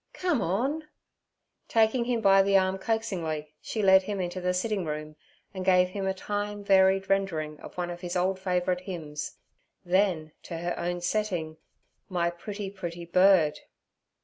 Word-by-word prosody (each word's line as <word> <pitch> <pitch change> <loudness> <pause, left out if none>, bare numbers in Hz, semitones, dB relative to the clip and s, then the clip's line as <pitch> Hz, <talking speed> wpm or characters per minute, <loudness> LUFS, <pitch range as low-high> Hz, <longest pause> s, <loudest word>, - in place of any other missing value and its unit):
'Come 350 -8 0
on.' 270 - -1 0.8
Taking 225 +2 +3
him 240 -2 0
by 195 -1 +6
the 195 0 +4
arm 190 0 +1
coaxingly, 175 -9 -2
she 215 - -3
led 190 -1 +7
him 200 +1 -4
into 180 0 -3
the 180 0 +1
sitting 195 +2 -1
room 155 -1 -5 0.4
and 190 -1 -4
gave 180 -1 +4
him 195 +1 -3
a 190 - +1
time—varied 195 -1 +2
rendering 165 -6 -1
of - - -12
one 175 -1 -2
of 175 0 -8
his 175 -1 -4
old 185 +1 +1
favourite 180 -1 0
hymns; 160 -6 -6 0.5
then, 175 -4 +1
to 170 - -6
her 175 +1 -2
own 175 0 -2
setting, 175 -5 -1 0.5
'My 170 -2 0
pretty, 200 +3 -6
pretty 175 -3 -6
bird.' 180 -3 +4
185 Hz, 155 wpm, -28 LUFS, 175-200 Hz, 0.8 s, led